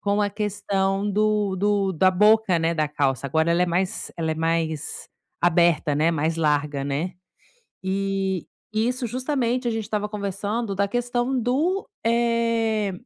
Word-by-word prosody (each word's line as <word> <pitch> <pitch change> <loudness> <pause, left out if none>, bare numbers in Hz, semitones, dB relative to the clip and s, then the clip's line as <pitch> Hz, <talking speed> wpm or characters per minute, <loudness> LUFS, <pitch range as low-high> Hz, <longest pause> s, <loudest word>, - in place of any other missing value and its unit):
com 205 +1 +1
a 205 - 0
questão 200 -1 -1
do 210 -1 +1
do 200 0 +1
da 185 +3 +4
boca, 210 0 +4
né, 165 +1 +1
da 155 -2 0
calça. 140 -3 0
Agora, 160 +4 +1
ela 170 +1 +3
é - - +2
mais 180 +2 -1
ela 160 -1 -1
é - - 0
mais 160 -1 -2 0.3
aberta, 170 -3 +3
né, 155 +3 +3
mais 160 0 0
larga, 150 -2 0
né. 145 +6 -2 0.7
E 195 -1 -1 0.3
isso, 245 +3 0
justamente 255 0 -1
a - - +1
gente 225 -1 -2
estava 210 0 -2
conversando 205 +1 -3
da 200 +1 0
questão 245 +3 -1
do 300 - 0 0.2
eh, 230 -3 +1
195 Hz, 150 wpm, -24 LUFS, 165-225 Hz, 0.7 s, da